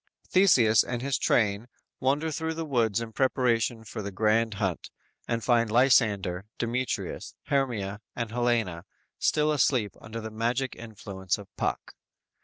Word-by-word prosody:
Theseus 125 Hz, -, +5 dB
and 120 Hz, 0 st, -4 dB
his 140 Hz, -2 st, 0 dB
train 105 Hz, 0 st, +1 dB, 0.3 s
wander 145 Hz, +5 st, +1 dB
through 160 Hz, +2 st, -3 dB
the 165 Hz, 0 st, -3 dB
woods 115 Hz, -7 st, +1 dB
in 115 Hz, -1 st, -6 dB
preparation 120 Hz, -3 st, +1 dB
for 110 Hz, 0 st, -6 dB
the 100 Hz, 0 st, -5 dB
grand 110 Hz, +2 st, +1 dB
hunt 95 Hz, -3 st, -2 dB, 0.4 s
and 115 Hz, -1 st, -1 dB
find 115 Hz, -2 st, +3 dB
Lysander, 105 Hz, -6 st, +3 dB
Demetrius, 125 Hz, +2 st, -3 dB
Hermia 110 Hz, -7 st, -1 dB
and 115 Hz, -2 st, -3 dB
Helena 115 Hz, -8 st, 0 dB, 0.3 s
still 155 Hz, 0 st, +2 dB
asleep 125 Hz, -6 st, +2 dB
under 115 Hz, +1 st, -7 dB
the 110 Hz, 0 st, -6 dB
magic 120 Hz, +4 st, -1 dB
influence 100 Hz, -5 st, -4 dB
of 100 Hz, -1 st, -13 dB
Puck. -, -, -3 dB
115 Hz, 140 wpm, -27 LUFS, 105-130 Hz, 0.4 s, Theseus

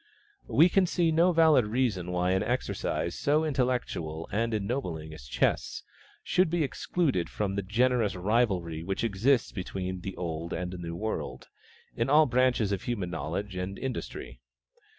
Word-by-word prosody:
We 165 Hz, -, +6 dB
can 185 Hz, 0 st, +3 dB
see 170 Hz, -1 st, +2 dB
no 170 Hz, +3 st, +4 dB
valid 160 Hz, -8 st, +5 dB
reason 105 Hz, -6 st, 0 dB
why 90 Hz, 0 st, +1 dB
an 95 Hz, 0 st, +2 dB
exercise 120 Hz, +4 st, -1 dB
so 150 Hz, +2 st, +1 dB
intellectual 125 Hz, -, -1 dB
and 115 Hz, +3 st, 0 dB
ennobling 100 Hz, -, -3 dB
as 65 Hz, -5 st, -11 dB
chess, -, -, 0 dB, 0.4 s
should 185 Hz, -2 st, +2 dB
be 170 Hz, -1 st, +1 dB
excluded 140 Hz, -, -1 dB
from 100 Hz, -2 st, -2 dB
the 100 Hz, -, -1 dB
generous 115 Hz, +1 st, +1 dB
rivalry 90 Hz, -5 st, 0 dB
which 95 Hz, +5 st, -3 dB
exists 115 Hz, +4 st, +2 dB
between 95 Hz, -1 st, -4 dB
the 95 Hz, +1 st, -5 dB
Old 85 Hz, -1 st, -4 dB
and 90 Hz, +1 st, -3 dB
the 90 Hz, -, -7 dB
New 85 Hz, -1 st, -5 dB
World, 110 Hz, +5 st, -4 dB, 0.5 s
in 115 Hz, +2 st, 0 dB
all 155 Hz, +2 st, +6 dB
branches 125 Hz, -4 st, +2 dB
of 100 Hz, -2 st, -1 dB
human 100 Hz, -8 st, -3 dB
knowledge 85 Hz, +6 st, -4 dB
and 90 Hz, +2 st, -4 dB
industry. 120 Hz, -, -5 dB
105 Hz, 155 wpm, -29 LUFS, 90-130 Hz, 0.5 s, We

